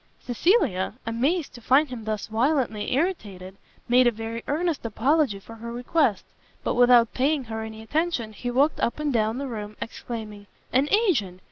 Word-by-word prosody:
Cecilia, 245 - +1
amazed 275 +9 0
to 240 - -11
find 270 +5 +4
him 235 -4 -7
thus 215 -2 -2
violently 235 -1 0
irritated, 205 - -2 0.3
made 250 +1 +5
a - - +4
very 225 +1 -5
earnest 320 +1 -1
apology 245 +1 +1
for 225 +3 -12
her 235 +1 -7
request; 245 - +1 0.4
but - - 0
without 245 -2 +5
paying 280 +2 +1
her 220 -2 -5
any 220 0 -7
attention, 290 -4 -1
he 245 +4 -5
walked 275 +5 +2
up 235 - -1
and 300 -2 -1
down 220 0 +1
the 280 - -3
room, 210 -3 -6
exclaiming, 215 -3 -7 0.3
"an 270 +4 +3
agent! 280 - +1
240 Hz, 165 wpm, -25 LUFS, 220-285 Hz, 0.4 s, made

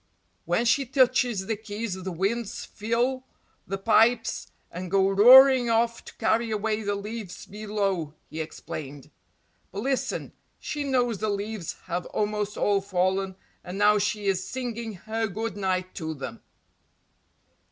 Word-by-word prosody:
"When 235 - +1
she 270 +3 +3
touches 245 -5 +2
the 220 - -1
keys 215 0 -5
the 190 0 -5
winds 200 +6 -2
fill 240 +4 -1 0.4
the 195 - -2
pipes 225 +3 +2 0.2
and 180 +1 -6
go 195 +1 +3
roaring 250 +4 +8
off 230 +1 +1
to - - -12
carry 230 0 +1
away 215 0 -1
the 205 -1 -1
leaves 210 -1 -6
below," 200 -7 -2
he 160 - -7
explained. 145 -3 -8 0.6
"But 200 +2 -5
listen 270 0 -2 0.2
she 295 -1 -4
knows 245 -6 +1
the 215 - -1
leaves 205 -3 -3
have 175 -1 -3
almost 210 0 -2
all 200 -1 +2
fallen 190 0 0 0.3
and 180 +2 -6
now 210 +1 +5
she 210 0 -1
is 190 -1 +1
singing 235 -3 -4
her 225 +1 -1
good 220 +3 -4
night 185 -2 -1
to 160 -1 -4
them." 130 -5 -7
210 Hz, 140 wpm, -26 LUFS, 190-230 Hz, 0.6 s, roaring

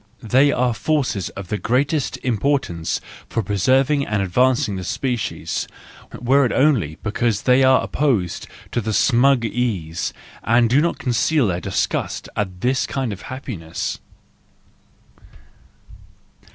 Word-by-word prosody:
They 130 +6 +4
are 125 -2 +1
forces 130 - -1
of 100 -3 -7
the 105 - -2
greatest 140 +4 0
importance 120 - 0 0.3
for 115 - -1
preserving 130 - +2
and 105 -1 0
advancing 125 +4 +2
the 95 - -5
species, 125 +3 -2 0.5
were 135 +4 +3
it 125 - +1
only 120 - +2
because 110 -1 0
they 130 +1 +4
are 130 0 +5
opposed 120 - -1 0.2
to 110 -2 -1
smug 125 +1 +3
ease, 100 -8 -2 0.3
and 115 0 +3
do 140 +4 +5
not 170 +1 0
conceal 130 +4 +1
their 90 -3 -1
disgust - - -2
at 95 -3 -3
this 130 +2 +1
kind 130 -6 -2
of 100 - -10
happiness. 100 - -5
120 Hz, 125 wpm, -21 LUFS, 100-135 Hz, 0.5 s, are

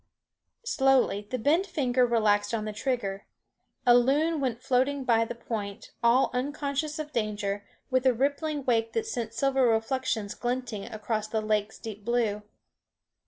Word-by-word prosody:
Slowly 265 - +2
the 255 - -2
bent 315 - +2
finger 255 -7 +2
relaxed 210 -2 +2
on 215 -1 -3
the 215 - -4
trigger. 205 -5 -2 0.6
A 245 - +7
loon 295 +6 +3
went 250 -3 -2
floating 265 +2 +1
by 230 -2 +3
the 240 - -6
point, 210 -4 -5
all 235 +3 +4
unconscious 285 +3 -2
of 305 -1 -5
danger, 205 -3 -2 0.3
with 255 0 +3
a - - +7
rippling 285 +3 -1
wake 225 -2 +1
that 450 - 0
sent 235 - -3
silver 265 +1 +2
reflections 225 -2 0
glinting 240 -4 -3
across 215 0 -3
the 220 0 -1
lake's 215 0 -1
deep 210 -2 -8
blue. 225 -2 0
245 Hz, 150 wpm, -28 LUFS, 215-270 Hz, 0.6 s, A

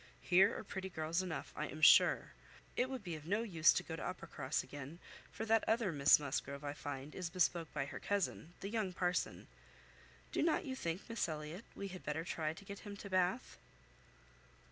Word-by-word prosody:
Here 190 +4 +5
are - - -5
pretty 190 -2 -5
girls 160 +1 -1
enough, 180 -4 -5
I 150 - -2
am 155 - -8
sure. - - +7 0.4
It 250 +1 +1
would 260 -4 -5
be 175 -3 -4
of 155 0 -7
no 205 +5 +1
use 170 -8 +5
to - - 0
go - - -5
to - - -6
Uppercross - - -2
again, 145 +3 -8 0.3
for 220 - -4
that 225 0 +4
other 225 -4 +2
Miss 145 -2 +6
Musgrove, 140 0 -3
I 145 -1 -3
find, 145 0 -6
is 180 -2 -3
bespoke 170 -2 +1
by 140 -2 -1
her - - -7
cousin, 190 -4 -2
the 195 - -3
young 210 -4 -1
parson. 180 0 -1 0.9
Do - - 0
not 320 +1 +2
you 260 -2 -3
think, 170 -6 -3
Miss 230 -6 -1
Elliot, 155 +5 -5
we 200 - -4
had 185 -1 -8
better 155 +2 -2
try 160 -3 -2
to 180 +5 -11
get 200 0 -7
him 205 -1 -8
to 200 0 -8
Bath?" 185 +6 +1
180 Hz, 200 wpm, -37 LUFS, 155-200 Hz, 0.9 s, sure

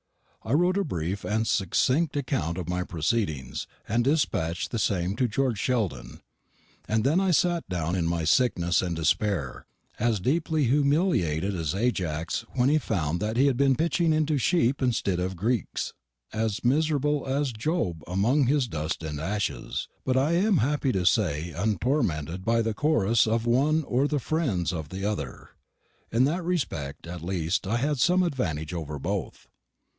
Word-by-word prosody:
I 110 - -2
wrote 175 +5 +3
a 200 - +2
brief 90 - -3
and 110 +1 0
succinct 130 - +1
account 125 - -1
of 90 -3 -4
my 90 0 -1
proceedings, 80 - -2 0.2
and 115 +3 +1
despatched 120 - 0
the 115 - -1
same 95 -2 0
to 125 - +2
George 120 -1 0
Sheldon, 90 - -2 0.7
and 110 0 +1
then 150 +8 +3
I 195 -1 +1
sat 175 - +1
down 85 -1 -1
in 85 -3 0
my 85 -1 -1
sickness 85 -2 +2
and 90 -2 -2
despair, 80 -2 -1 0.3
as 115 -2 +1
deeply 155 - +1
humiliated 135 - +2
as 80 0 -2
Ajax 90 -8 -1
when 125 +1 +3
he 155 +2 +4
found 85 - -1
that 110 +2 -2
he 135 - +5
had 140 -3 +3
been 135 -1 +4
pitching 165 +2 +1
into 155 -2 +1
sheep 140 -3 +2
instead 115 -8 0
of 95 +1 -2
Greeks, 110 +4 -2 0.4
as 110 -1 -1
miserable 150 +1 +1
as 135 -1 0
Job 110 - -2
amongst 120 - +2
his 140 -3 +2
dust 80 -3 -3
and 75 -2 -4
ashes, 100 +4 -2 0.2
but 130 0 +1
I 140 +4 +2
am 190 +3 +3
happy 140 +1 +1
to 95 -2 0
say 85 -6 +1
untormented 95 - -1
by 115 +2 +2
the 115 -1 -1
chorus 115 -5 +2
of 115 +1 0
one 145 +7 +2
or 130 +1 +1
the 150 - 0
friends 115 - -1
of 80 -4 -5
the 95 +2 -5
other. 75 -12 -4 0.6
In 115 +3 +3
that 165 +7 0
respect 85 - -3
at 85 0 -7
least 85 0 -1
I 115 - +1
had 145 +2 0
some 180 +8 +4
advantage 85 - -2
over 75 -3 -4
both. 65 - -4
110 Hz, 165 wpm, -26 LUFS, 85-140 Hz, 0.7 s, he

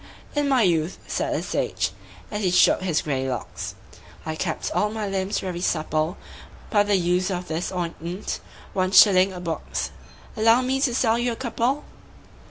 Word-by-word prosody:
"In 290 -1 +1
my 260 -4 +4
youth," 170 -2 +1
said - - -1
the - - -2
sage, - - -1 0.4
as 210 - -2
he 190 - +2
shook 180 +1 +5
his 175 -4 0
grey 135 -3 -1
locks, 125 - -5 0.5
"I 160 0 -3
kept 155 - -2
all 210 - +1
my 215 -1 -3
limbs 195 +1 -1
very 180 -2 -4
supple 155 0 0 0.5
By 205 - +5
the 205 0 +2
use 180 +1 +1
of 180 -1 -3
this 165 +2 -2
ointment 175 +1 -4 0.3
one 185 0 0
shilling 190 -2 +7
a 180 - -7
box 165 -4 -3 0.4
Allow 225 +3 +5
me 265 +1 0
to 250 -4 +2
sell 230 -2 +2
you 240 0 +1
a - - -6
couple?" 250 +3 -1
190 Hz, 175 wpm, -24 LUFS, 170-225 Hz, 0.5 s, shilling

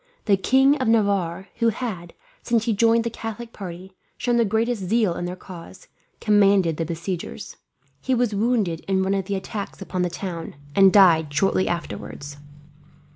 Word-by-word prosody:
The 205 - +4
King 265 +9 +3
of 255 - 0
Navarre, 200 -5 +1
who 230 0 +3
had, 200 -7 -5 0.3
since 235 -2 +1
he 230 - +1
joined 230 +2 +3
the 235 - -3
Catholic 230 +1 -7
party, 185 -1 -9 0.2
shown 240 -1 0
the 235 - +3
greatest 220 0 -1
zeal 215 -1 +2
in 175 - -4
their 180 +1 -4
cause, 185 - -12 0.3
commanded 200 -6 +3
the 165 - -1
besiegers. 170 +2 -5 0.5
He 260 - 0
was 240 -3 +1
wounded 205 -6 0
in 190 -1 +1
one 190 +1 0
of 195 -2 -1
the 200 0 -2
attacks 200 +1 -6
upon 185 -1 -4
the 180 - +1
town, 175 -3 -6 0.2
and 195 -1 +7
died 165 -7 +5
shortly 185 +5 +1
afterwards. 145 -4 -5
195 Hz, 170 wpm, -23 LUFS, 175-225 Hz, 0.5 s, and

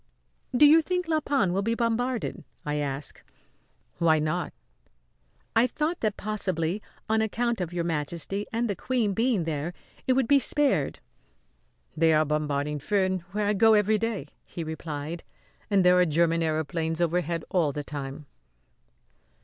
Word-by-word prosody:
"Do 295 - +8
you 315 +3 +7
think 360 +1 -2
La 315 -1 +2
Panne 270 -12 +1
will 195 - +1
be 230 +3 0
bombarded?" 235 +1 -1 0.2
I 150 0 -1
asked. 140 -1 -3 0.8
"Why 160 -2 +4
not?" 155 +3 -1 1.0
"I 230 +2 +5
thought 310 +7 -2
that 215 -2 -1
possibly, 190 -3 -1 0.3
on 220 0 +2
account 230 0 -1
of 175 -2 -3
Your 175 -1 -2
Majesty 170 +5 -2
and 235 +1 0
the 200 - -2
Queen 230 0 0
being 225 -3 +1
there, 160 +2 -3 0.3
it 260 - +4
would 260 -2 +2
be 280 +2 +6
spared. 290 0 +1 0.9
"They 160 0 +4
are 155 0 +4
bombarding 150 -1 -1
Furnes, 190 +2 0
where 210 +1 -1
I 205 - +2
go 220 +2 +5
every 210 +1 +3
day," 225 -1 -2 0.2
he 170 - -6
replied. 160 0 -5 0.5
"And 195 -3 +3
there 180 0 +6
are 180 - +5
German 165 +2 +2
aëroplanes 160 +1 -1
overhead 170 -1 0
all 165 -6 +2
the 145 +1 -4
time." 140 0 -6
180 Hz, 155 wpm, -27 LUFS, 160-225 Hz, 1.0 s, Do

